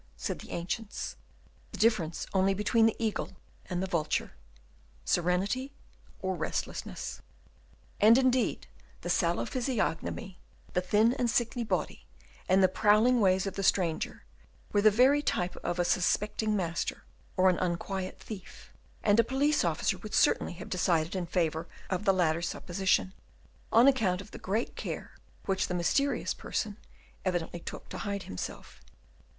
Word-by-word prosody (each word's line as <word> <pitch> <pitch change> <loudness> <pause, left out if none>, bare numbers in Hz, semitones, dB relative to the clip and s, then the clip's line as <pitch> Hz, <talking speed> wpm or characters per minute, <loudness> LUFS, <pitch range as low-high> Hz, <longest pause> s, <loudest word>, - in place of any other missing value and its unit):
said - - -3
the - - -11
ancients. 200 +5 -4 0.6
The - - -5
difference 180 -9 +1
only 195 0 +3
between 220 +3 +3
the 225 - 0
eagle 220 -4 -2 0.3
and 180 0 -2
the - - -2
vulture, 160 -4 -1 0.7
serenity 195 +10 0 0.5
or 190 0 0
restlessness. - - -4 0.8
And 220 +3 +7
indeed 255 -2 +2 0.4
the - - -2
sallow - - +1
physiognomy, 230 - -2 0.3
the 180 - +2
thin 215 +6 +3
and 245 -2 0
sickly 235 +1 0
body, 225 - -2 0.4
and 190 +1 +5
the - - +7
prowling 215 +6 +4
ways 190 -1 +3
of 195 - -3
the 195 - -3
stranger, 180 -4 0 0.5
were 205 - +4
the 215 - +7
very 260 +7 +4
type 180 -10 -1
of 175 - -3
a 175 - +1
suspecting 210 +4 +1
master, 170 -4 -2 0.3
or 185 0 +5
an 180 - -2
unquiet 185 +1 -2
thief; 200 -4 -10 0.3
and 205 +1 +4
a - - +7
police 280 +5 +2
officer 175 +3 0
would 210 +2 -5
certainly - - +3
have 175 +2 -9
decided 175 -1 +1
in 180 -2 -2
favour 165 -1 0 0.2
of 190 +2 -1
the 195 - +6
latter 170 -3 +2
supposition, 185 +2 0 0.6
on 235 +4 +7
account 215 -10 +3
of 200 +2 -10
the - - -9
great 215 +5 -2
care - - -5 0.3
which 190 -1 0
the 180 - -2
mysterious 275 - +1
person 210 -1 -3 0.5
evidently 175 -2 -2
took - - -8
to - - -6
hide 200 -2 -3
himself. 90 - -7
195 Hz, 150 wpm, -30 LUFS, 180-225 Hz, 0.8 s, And